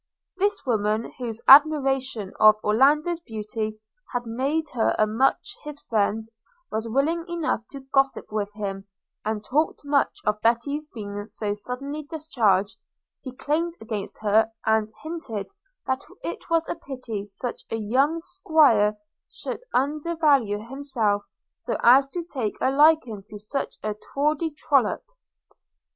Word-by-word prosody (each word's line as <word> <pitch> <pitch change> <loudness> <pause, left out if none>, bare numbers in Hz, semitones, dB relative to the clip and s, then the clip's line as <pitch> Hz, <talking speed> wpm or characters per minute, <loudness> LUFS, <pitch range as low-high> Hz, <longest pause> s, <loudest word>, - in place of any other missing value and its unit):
This 405 -1 0
woman, 215 -2 0
whose 235 -2 -5
admiration 270 -7 +5
of 215 0 +8
Orlando's 295 +10 +3
beauty 215 -5 -5 0.3
had 245 -1 -2
made 270 +8 0
her 230 -3 +2
much 255 +7 +1
his 300 -1 -8
friend, 220 -1 0 0.5
was 220 +1 -2
willing 300 +8 +1
enough 325 -9 -2
to 275 - -9
gossip 270 -2 0
with 205 -1 -2
him, 195 -2 -5 0.4
and 215 0 -2
talked 295 +4 0
much 280 -1 +1
of 210 0 0
Betty's 280 +6 +1
being 205 -5 -7
so 205 -2 -3
suddenly 255 +8 -5
discharged, 245 - 0 0.5
declaimed 300 +6 -2
against 215 -3 -5
her, 220 +2 +3
and 220 -1 +2
hinted 305 -11 -5 0.4
that 260 +1 -1 0.2
it - - -6
was 330 -1 +2
a - - -1
pity 255 -10 -6
such 205 +5 -6
a - - -2
young 260 +9 +1
'squire 230 -11 +3 0.3
should - - -6
undervalue 280 -6 +1
himself 235 -7 -1 0.3
so - - -3
as 265 +3 +7
to 345 +5 -4
take 255 -10 -3
a 260 - +2
liking 290 -7 +4
to 210 - -9
such 215 +7 -4
a 215 0 -1
tawdry 295 +8 -1
trollop. 300 - +1
250 Hz, 130 wpm, -25 LUFS, 215-295 Hz, 0.5 s, of